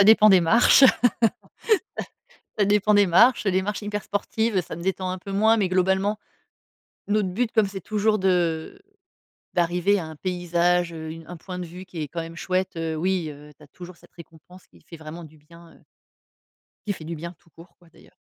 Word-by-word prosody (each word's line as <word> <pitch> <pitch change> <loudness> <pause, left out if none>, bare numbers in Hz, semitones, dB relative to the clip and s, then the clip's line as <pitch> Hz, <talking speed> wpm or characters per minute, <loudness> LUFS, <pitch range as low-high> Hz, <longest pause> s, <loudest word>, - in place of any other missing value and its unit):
Ça - - +7
dépend 215 0 +7
des 190 -3 +6
marches! 230 +10 +5 1.7
Ça 205 - +3
dépend 210 +1 +2
des 205 -1 +5
marches, 220 +8 +4
heu, 195 - +2
des 185 +1 +1
marches 210 +3 -4
hyper 210 0 -4
sportives, 220 +1 -1
heu, - - +3
ça 165 - -8
me 170 - -9
détend 185 0 -2
un 185 - -4
peu 195 - -9
moins, 220 +3 +3
mais 195 -4 0
globalement, 190 +3 +1 0.9
notre 205 -2 +1
but, 225 +5 -2
comme 220 -2 +3
c'est 195 -1 -7
toujours 215 +2 0
de, 175 -4 0
heu, - - -26 0.7
d'arriver 175 +3 +1
à 175 - -4
un 160 - -9
paysage, 175 0 0
heu, 160 -1 -7
une 165 0 -10
un 175 - -9
point 180 +2 -8
de 180 - -5
vue 180 +3 -10
qui 180 -3 -8
est 150 - -5
quand 170 - -5
même 165 +1 -8
chouette, 185 -1 -2
heu, 165 -1 -3
oui, 180 0 -1
heu, 150 +1 -13
tu - - -20
as - - -17
toujours 175 +4 -12
cette - - -22
récompense 170 +2 -16
qui - - -22
fait 165 - -11
vraiment 160 +2 -9
du 155 0 -15
bien, 170 +2 -18
heu - - -24 1.0
qui 205 - 0
fait 175 - -10
du 165 +1 -5
bien, 170 +3 -7
tout 170 - -28
court, 165 +3 -17
quoi, 175 - -22
d'ailleurs. - - -21
180 Hz, 215 wpm, -24 LUFS, 165-200 Hz, 1.7 s, Ça